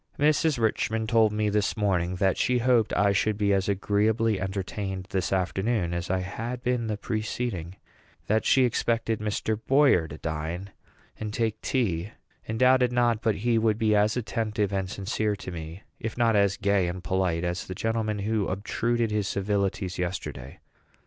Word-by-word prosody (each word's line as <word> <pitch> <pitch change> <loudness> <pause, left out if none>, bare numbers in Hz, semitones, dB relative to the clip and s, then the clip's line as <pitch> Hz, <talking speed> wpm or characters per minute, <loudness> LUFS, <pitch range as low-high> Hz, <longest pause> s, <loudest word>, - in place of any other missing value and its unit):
Mrs. 150 0 +3
Richman 110 0 0
told 110 -1 +3
me 105 0 0
this 105 +1 0
morning 90 -4 +1
that 95 0 +2
she 125 0 +1
hoped 120 -2 +3
I 100 +1 +3
should 105 +1 +1
be 100 -1 +2
as 95 0 +1
agreeably 105 +2 +1
entertained 95 0 -4
this 95 -2 -1
afternoon 95 0 0
as 85 +1 -3
I 95 0 +1
had 115 +6 -5
been 125 -2 0
the 105 -1 -2
preceding; 110 -5 -3 0.5
that 110 +1 +1
she 130 - +4
expected 115 -1 0
Mr. 105 +1 -2
Boyer 135 - +4
to 75 - -9
dine 80 +5 -4 0.5
and 110 -1 -4
take 110 -1 -1
tea, 105 -6 -1 0.3
and 110 - -3
doubted 125 0 +4
not 120 -2 +2
but 110 -2 +1
he 115 -2 +3
would 110 -1 +2
be 110 -2 +2
as 105 +3 +2
attentive 110 -3 -1
and 95 -1 -1
sincere 105 +2 -1
to 95 - -8
me, 85 +2 -7 0.2
if 110 +1 -5
not 115 -2 +3
as 100 -1 +3
gay 100 -3 +2
and 90 +1 -5
polite, 90 -3 0
as 90 +1 -3
the 95 - -5
gentleman 110 0 -1
who 105 0 -1
obtruded 115 +4 -1
his 105 -2 0
civilities 100 -2 -1
yesterday. 85 -7 -4
105 Hz, 170 wpm, -27 LUFS, 95-115 Hz, 0.5 s, she